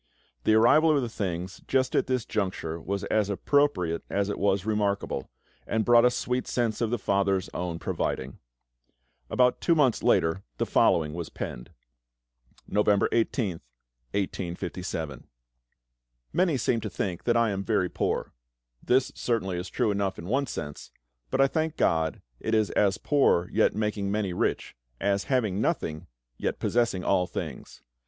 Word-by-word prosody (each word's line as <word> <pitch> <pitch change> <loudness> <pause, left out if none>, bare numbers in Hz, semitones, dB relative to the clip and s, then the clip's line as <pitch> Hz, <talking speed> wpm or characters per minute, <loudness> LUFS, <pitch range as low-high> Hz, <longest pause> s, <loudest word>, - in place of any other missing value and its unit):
The 110 - +5
arrival 150 +8 +5
of - - +3
the - - -1
things 95 -3 -4
just 130 -1 +1
at - - +2
this 125 -2 0
juncture 95 -6 -2
was 100 +2 -3
as 105 0 +1
appropriate 100 - +1
as 100 0 0
it 105 - -3
was 100 -1 +1
remarkable, 100 -9 -1 0.4
and 110 -1 0
brought 120 0 +6
a - - +7
sweet 125 +1 -2
sense 115 -2 -1
of 115 - +1
the 120 - 0
FATHER'S 100 -2 0
own 90 -2 -3
providing. 65 -4 -3 0.9
About 125 -1 +2
two 170 - +3
months 135 -7 +3
later 80 +4 +2 0.2
the - - 0
following 75 -3 +3
was 85 -1 -5
penned: - - -6 1.0
November 105 -1 +2
18th, 110 -6 0 0.5
1857. 90 -6 -4 1.1
Many 175 -5 +2
seem 115 -1 +1
to 105 - -4
think 90 -1 -3
that 120 -1 +3
I 115 -2 +3
am 100 0 -2
very 100 -4 +1
poor. - - -2 0.5
This 130 +1 +2
certainly 95 -7 -1
is 90 - -6
true 120 -4 +1
enough 100 -1 -1
in 85 - -8
one 135 +8 0
sense, 75 -9 -6 0.4
but - - -1
I 135 - +7
thank 160 +3 -1
GOD 80 -1 +1 0.2
it 110 - 0
is 110 -1 +2
"as 100 -2 +2
poor, 135 - +2
yet - - +2
making 105 -2 -1
many 100 -3 -1
rich; - - -1 0.2
as 100 0 0
having 110 -7 0
nothing, 80 - -2 0.3
yet - - -1
possessing 115 -6 0
all 90 -2 +2
things." 80 -6 -7
100 Hz, 155 wpm, -27 LUFS, 90-120 Hz, 1.1 s, a